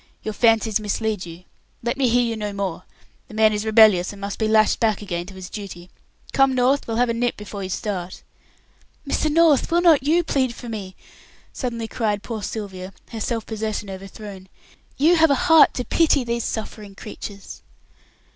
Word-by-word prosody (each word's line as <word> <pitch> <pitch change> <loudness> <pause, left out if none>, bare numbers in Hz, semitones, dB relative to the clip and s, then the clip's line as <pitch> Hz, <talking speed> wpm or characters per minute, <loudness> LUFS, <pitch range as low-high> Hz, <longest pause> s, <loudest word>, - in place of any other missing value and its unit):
"Your 215 - -3
fancies 225 -1 +3
mislead 210 -2 -2
you. 170 +2 -11 0.4
Let 240 +2 -1
me 265 -2 +2
hear 245 +1 +3
you 230 -1 -1
no 210 -2 -4
more. 190 -3 -4 0.4
The 215 - -12
man 220 0 +4
is 210 +1 -2
rebellious, 215 -5 +5
and 205 - -12
must 200 0 -5
be 220 - +1
lashed 215 -1 +3
back 215 -3 +1
again 175 -3 -4
to 195 - -11
his 185 -1 -8
duty. 185 -4 -9 0.4
Come, 270 -1 +3
North, 255 +3 +2
we'll 225 -1 -2
have 245 0 +2
a - - +1
nip 240 +1 -1
before 210 -1 -7
you 190 - -5
start." 185 -2 -4 0.8
"Mr. 305 +2 0
North, 320 -3 +4
will 340 0 +3
not 330 -5 +5
you 320 +6 +2
plead 260 -6 0
for 245 - -9
me?" 200 -4 -6 0.6
suddenly 235 -3 -4
cried 210 -3 -2
poor 225 -3 -5
Sylvia, 195 -2 -6 0.2
her 225 -2 -6
self 230 0 -2
possession 215 -2 -4
overthrown. 195 0 -10 0.5
"You 330 +5 +4
have 320 0 +5
a 280 - +4
heart 325 -1 +5
to 250 - -3
pity 310 -5 +3
these 235 -1 -2
suffering 210 -2 -6
creatures." 200 -1 -9
220 Hz, 185 wpm, -22 LUFS, 200-245 Hz, 0.8 s, rebellious